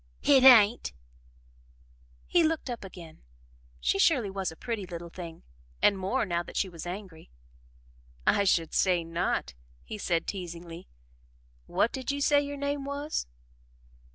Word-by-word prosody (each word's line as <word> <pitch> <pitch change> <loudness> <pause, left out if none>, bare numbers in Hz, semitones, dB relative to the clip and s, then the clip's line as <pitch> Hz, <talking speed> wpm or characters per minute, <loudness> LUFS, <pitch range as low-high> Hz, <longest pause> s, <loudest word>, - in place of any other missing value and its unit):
"Hit 275 -2 +5
hain't!" 230 - +7 1.3
He 350 - +3
looked 320 -5 0
up 235 - -6
again. 175 -4 -11 0.6
She 60 - +1
surely 235 -6 +3
was 190 -3 -3
a - - -11
pretty 220 -1 -4
little 170 -1 -7
thing 170 -2 -9 0.4
and 205 - +4
more, 195 +7 -1
now 170 -3 -1
that - - -8
she 195 - +1
was 170 -1 -8
angry. 180 - -8 1.0
"I 200 - +4
should 165 -4 +2
say 180 -3 +2
not," 165 - -2 0.3
he 215 - -7
said 170 -4 0
teasingly. 175 -2 -7 0.8
"What 230 - +1
did 260 -2 -5
you 280 0 -1
say 285 0 +4
your 285 0 -5
name 285 0 -2
was?" 285 +2 -3
195 Hz, 145 wpm, -28 LUFS, 170-265 Hz, 1.3 s, hain't